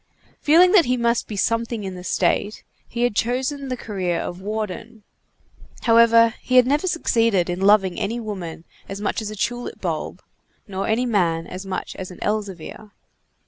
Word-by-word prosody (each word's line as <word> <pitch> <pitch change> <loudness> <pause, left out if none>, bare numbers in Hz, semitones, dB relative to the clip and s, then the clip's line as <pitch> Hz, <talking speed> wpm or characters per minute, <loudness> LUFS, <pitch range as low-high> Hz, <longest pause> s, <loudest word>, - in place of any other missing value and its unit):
Feeling 345 +5 +5
that 375 -5 +6
he 250 +1 +1
must 235 0 +1
be 215 - -6
something 230 +1 -1
in 190 -1 -5
the 180 -1 -9
State, 205 +3 0 0.2
he 240 +1 -3
had 245 -4 +1
chosen 260 +5 -1
the 255 -1 -3
career 185 -7 -2
of 180 +1 -5
warden. 215 +2 -5 0.8
However, 230 0 +5
he 255 - -1
had 250 -1 +7
never 290 +7 +1
succeeded 230 - +1
in 175 +2 -4
loving 195 -2 +4
any 230 +4 -2
woman 185 -8 -6 0.3
as 195 - -5
much 205 +2 -2
as 215 - -4
a 215 - -7
tulip 240 +4 -3
bulb, - - -4 0.4
nor 195 -1 -3
any 225 +3 +1
man 170 -8 +1
as 185 +2 -8
much 190 - -4
as 185 - -6
an 180 - -11
Elzevir. 210 -1 -4
215 Hz, 175 wpm, -22 LUFS, 190-240 Hz, 0.8 s, had